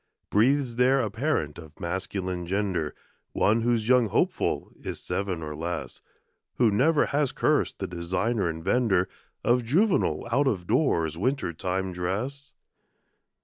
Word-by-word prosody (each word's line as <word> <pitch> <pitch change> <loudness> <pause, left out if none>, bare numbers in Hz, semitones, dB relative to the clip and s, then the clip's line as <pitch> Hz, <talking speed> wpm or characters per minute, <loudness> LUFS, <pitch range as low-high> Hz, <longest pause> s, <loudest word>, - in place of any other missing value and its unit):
Breathes 125 +2 +2
there 130 +2 +4
a 110 -5 -1
parent 115 - -1
of 80 -1 -13
masculine 90 0 -3
gender, 95 -5 -1 0.4
One 110 +3 +3
whose 115 -2 +1
young 125 -2 +5
hopeful - - 0
is - - -6
seven 95 -4 -3
or 75 -1 -5
less, 85 +2 -5 0.5
Who 120 -3 +3
never 145 +9 +3
has 145 -2 0
cursed - - +1
the - - -3
designer 90 +4 -1
and 80 0 -5
vender 95 -5 +2 0.4
Of 120 +1 +3
juvenile 145 - +2
out 140 +4 +3
of 95 -9 0
doors 85 - +1
winter 130 -5 0
time 95 +3 -2
dress? 110 +11 -4
105 Hz, 140 wpm, -27 LUFS, 90-125 Hz, 0.5 s, young